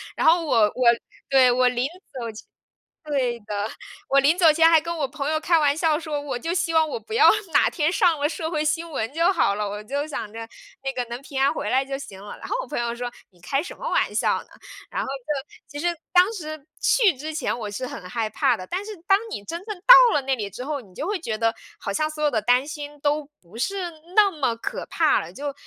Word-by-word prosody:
然 -, -, -1 dB
后 335 Hz, +2 st, +5 dB
我 295 Hz, -, +1 dB
我 210 Hz, -1 st, +4 dB, 0.6 s
对， 260 Hz, -2 st, +6 dB
我 250 Hz, +1 st, +3 dB
临 250 Hz, 0 st, 0 dB
走 270 Hz, -8 st, -8 dB
前 215 Hz, -, -12 dB, 0.6 s
对 265 Hz, -5 st, 0 dB
的， -, -, -24 dB, 0.6 s
我 275 Hz, -, +5 dB
临 300 Hz, +6 st, +3 dB
走 330 Hz, -4 st, +7 dB
前 325 Hz, +1 st, +5 dB
还 325 Hz, -1 st, +6 dB
跟 335 Hz, +2 st, -4 dB
我 280 Hz, -3 st, -1 dB
朋 280 Hz, +1 st, -4 dB
友 310 Hz, 0 st, 0 dB
开 330 Hz, +1 st, +3 dB
玩 290 Hz, -2 st, +2 dB
笑 315 Hz, -2 st, +2 dB
说， 305 Hz, -3 st, -3 dB
我 275 Hz, -4 st, -4 dB
就 330 Hz, +8 st, -2 dB
希 340 Hz, -2 st, 0 dB
望 320 Hz, -1 st, +3 dB
我 465 Hz, -, -4 dB
不 440 Hz, -, -8 dB
要 445 Hz, -1 st, +7 dB, 0.2 s
哪 285 Hz, -, +5 dB
天 305 Hz, -1 st, 0 dB
上 335 Hz, -3 st, +2 dB
了 290 Hz, -, +2 dB
社 320 Hz, 0 st, -4 dB
会 310 Hz, -2 st, -1 dB
新 325 Hz, +2 st, -1 dB
闻 265 Hz, -6 st, -3 dB
就 335 Hz, +5 st, +3 dB
好 200 Hz, -, +2 dB
了， 210 Hz, 0 st, -2 dB
我 205 Hz, +1 st, -6 dB
就 280 Hz, +7 st, -3 dB
想 245 Hz, -8 st, -5 dB
着 225 Hz, 0 st, -7 dB, 0.4 s
那 270 Hz, -, -1 dB
个 255 Hz, -1 st, -2 dB
能 240 Hz, +1 st, -5 dB
平 275 Hz, -1 st, -5 dB
安 275 Hz, +1 st, +4 dB
回 -, -, -4 dB
来 265 Hz, +1 st, +2 dB
就 270 Hz, 0 st, -4 dB
行 195 Hz, -9 st, -10 dB
了。 205 Hz, -, -9 dB
然 -, -, -8 dB
后 -, -, -2 dB
我 -, -, -10 dB
朋 -, -, -3 dB
友 235 Hz, 0 st, -1 dB
说 245 Hz, 0 st, -4 dB, 0.2 s
你 180 Hz, -3 st, -26 dB
开 275 Hz, +10 st, -1 dB
什 330 Hz, -, -8 dB
么 -, -, -5 dB
玩 -, -, +1 dB
笑 -, -, +2 dB
呢？ -, -, -24 dB, 0.4 s
然 -, -, -3 dB
后 -, -, -5 dB
就 275 Hz, +1 st, -4 dB, 0.2 s
其 290 Hz, 0 st, -7 dB
实 -, -, +3 dB, 0.2 s
当 365 Hz, +4 st, +5 dB
时 310 Hz, -7 st, -7 dB, 0.2 s
去 435 Hz, -7 st, +4 dB
之 310 Hz, +4 st, -6 dB
前 300 Hz, -, -1 dB
我 215 Hz, -3 st, -4 dB
是 250 Hz, +5 st, -5 dB
很 180 Hz, -, -8 dB
害 220 Hz, +2 st, -2 dB
怕 250 Hz, +3 st, +2 dB
的， 185 Hz, -, -8 dB
但 375 Hz, +3 st, -3 dB
是 430 Hz, -, -7 dB
当 390 Hz, +1 st, +5 dB
你 -, -, -5 dB
真 335 Hz, -, -6 dB
正 425 Hz, 0 st, -5 dB
到 -, -, +8 dB
了 295 Hz, -, +3 dB
那 265 Hz, 0 st, 0 dB
里 210 Hz, -4 st, -4 dB
之 245 Hz, +6 st, -8 dB
后， 290 Hz, 0 st, -3 dB
你 195 Hz, -7 st, -18 dB
就 295 Hz, -, -4 dB
会 410 Hz, -1 st, -1 dB
觉 230 Hz, -10 st, -3 dB
得 225 Hz, +1 st, +1 dB, 0.3 s
好 200 Hz, -, -3 dB
像 305 Hz, +9 st, 0 dB
所 305 Hz, 0 st, -6 dB
有 300 Hz, -, +3 dB
的 225 Hz, -, 0 dB
担 245 Hz, +4 st, +3 dB
心 295 Hz, -1 st, -7 dB
都 290 Hz, 0 st, 0 dB
不 185 Hz, +6 st, -14 dB
是 375 Hz, +5 st, -2 dB, 0.2 s
那 415 Hz, -1 st, +6 dB
么 280 Hz, -9 st, -1 dB
可 230 Hz, -, -5 dB
怕 -, -, +2 dB
了 -, -, -8 dB
就， 285 Hz, 0 st, -5 dB
290 Hz, 275 characters per minute, -24 LUFS, 245-325 Hz, 0.6 s, 到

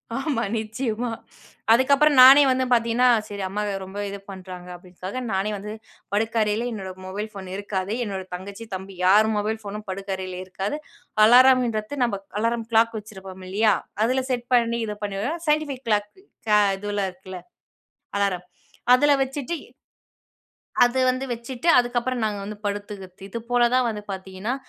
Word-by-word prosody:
ஆமா. 270 Hz, -4 st, -1 dB
நிச்சயமா. 225 Hz, +2 st, -3 dB, 0.6 s
அதுக்கப்புறம் 280 Hz, +4 st, +4 dB
நானே 270 Hz, +3 st, +10 dB
வந்து 260 Hz, 0 st, +2 dB
பார்த்தீங்கன்னா, 235 Hz, +1 st, +3 dB, 0.2 s
சரி 205 Hz, -1 st, -6 dB
அம்மா 200 Hz, +3 st, -3 dB
இது 205 Hz, -, -2 dB
ரொம்ப 190 Hz, +2 st, -7 dB
இது 200 Hz, 0 st, -6 dB
பண்றாங்க. 185 Hz, -1 st, -9 dB
அப்படீன்னுக்காக 185 Hz, +6 st, -7 dB
நானே 195 Hz, +2 st, 0 dB
வந்து 205 Hz, +2 st, -7 dB, 0.4 s
படுக்கறையில 220 Hz, +1 st, +1 dB
என்னோட 195 Hz, -4 st, -5 dB
மொபைல் 205 Hz, +3 st, -5 dB
ஃபோன் 195 Hz, -3 st, -9 dB
இருக்காது. 200 Hz, 0 st, -3 dB
என்னோட 195 Hz, -4 st, -4 dB
தங்கச்சி, 200 Hz, +5 st, -8 dB
தம்பி 190 Hz, +1 st, -8 dB
யார் 210 Hz, +4 st, +6 dB
மொபைல் 215 Hz, +2 st, -1 dB
ஃபோனும் 210 Hz, +1 st, -7 dB
படுக்கறையில 190 Hz, -1 st, -4 dB
இருக்காது. 195 Hz, +8 st, -3 dB, 0.5 s
அலாரம்ன்றத்து, 245 Hz, 0 st, +5 dB
நம்ப 215 Hz, -5 st, -1 dB, 0.2 s
அலாரம் 230 Hz, +1 st, 0 dB
க்ளாக் 230 Hz, +1 st, +4 dB
வச்சிருப்போம் 190 Hz, -3 st, -11 dB
இல்லையா? 210 Hz, +3 st, +3 dB, 0.3 s
அதுல 255 Hz, +3 st, +1 dB
செட் 245 Hz, -1 st, -2 dB
பண்ணி, 235 Hz, -1 st, +2 dB
இது 210 Hz, -1 st, -4 dB
பண்ணிருவேன். 205 Hz, +12 st, -3 dB
சைன்டிஃபிக் 300 Hz, -4 st, 0 dB
கிளாக் 210 Hz, -1 st, +1 dB, 0.4 s
க 210 Hz, 0 st, +6 dB, 0.2 s
இதுவெல்லாம் 205 Hz, -1 st, -2 dB
இருக்குல்ல. 185 Hz, 0 st, -10 dB, 0.8 s
அலாரம். 190 Hz, -3 st, 0 dB, 0.5 s
அதுல 290 Hz, +4 st, +5 dB
வச்சுட்டு 275 Hz, +4 st, -4 dB, 1.3 s
அது 245 Hz, +2 st, +2 dB
வந்து 255 Hz, +1 st, -1 dB
வச்சுட்டு, 240 Hz, +5 st, -6 dB
அதுக்கப்புறம் 245 Hz, 0 st, -1 dB
நாங்க 210 Hz, -1 st, -2 dB
வந்து 210 Hz, +1 st, -7 dB
படுத்துக்கறத்து. 200 Hz, -2 st, -6 dB
இது 230 Hz, -, -4 dB
போல 240 Hz, -1 st, +4 dB
தான் 255 Hz, -1 st, +3 dB
வந்து 210 Hz, -2 st, -5 dB
பார்த்தீங்கன்னா, 190 Hz, +5 st, -4 dB
215 Hz, 145 wpm, -24 LUFS, 195-245 Hz, 1.3 s, நானே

